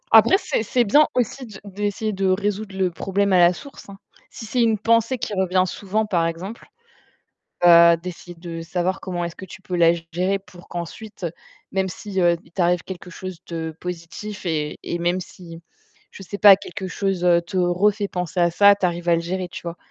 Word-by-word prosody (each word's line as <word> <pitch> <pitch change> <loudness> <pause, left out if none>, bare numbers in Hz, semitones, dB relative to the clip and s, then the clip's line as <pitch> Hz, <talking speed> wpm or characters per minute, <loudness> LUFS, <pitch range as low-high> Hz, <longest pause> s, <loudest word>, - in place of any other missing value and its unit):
Après, - - +8
c'est 395 - -2
c'est 245 +3 +2
bien 295 +8 +5
aussi 250 +2 -1
de 210 -4 -11
d'essayer 205 +2 -3
de 195 -1 -1
résoudre 205 +1 -1
le 185 -2 +1
problème 195 +3 -1
à 185 - +5
la 175 0 +6
source, 280 +1 -12
hein. 195 - -10 0.3
Si 225 - -9
c'est 245 +3 0
une 225 -2 +3
pensée 230 +3 +2
qui 240 -3 -4
revient 185 -1 +2
souvent, 205 +3 -2
par 175 -5 +1
exemple, 185 +7 -6 1.0
heu, 170 -1 +8
d'essayer 175 0 -9
de 165 -1 -7
savoir 180 +3 -2
comment 175 -2 -3
est-ce 170 - -6
que - - -9
tu 190 - -12
peux 180 - -4
la 170 -1 +6 0.2
gérer 185 +3 0
pour 180 -2 -16
qu'ensuite, 180 +3 -7 0.5
même 190 0 +1
si, 195 +1 -5
heu, 175 -1 +4
il - - -22
t'arrive 175 -1 +1
quelque 185 -1 -8
chose 185 0 -7
de 160 -1 -4
positif 180 +4 -7
et 155 -3 -2
et 170 - -3
même 175 +2 0
si, 170 -2 -11 0.5
je - - -12
sais 195 +2 -6
pas, 200 -2 +8
quelque 190 -1 -7
chose, 195 -2 -2
heu, 175 -1 +4
te 170 +3 -10
refait 195 +4 +2
penser 180 0 -2
à 170 0 +3
ça, 200 +3 +6
tu 195 - -1
arrives 175 0 -2
à 170 - +5
le 165 - -1
gérer, 180 +2 -3
tu - - -9
vois? 170 0 -6
185 Hz, 205 wpm, -22 LUFS, 175-205 Hz, 1.0 s, Après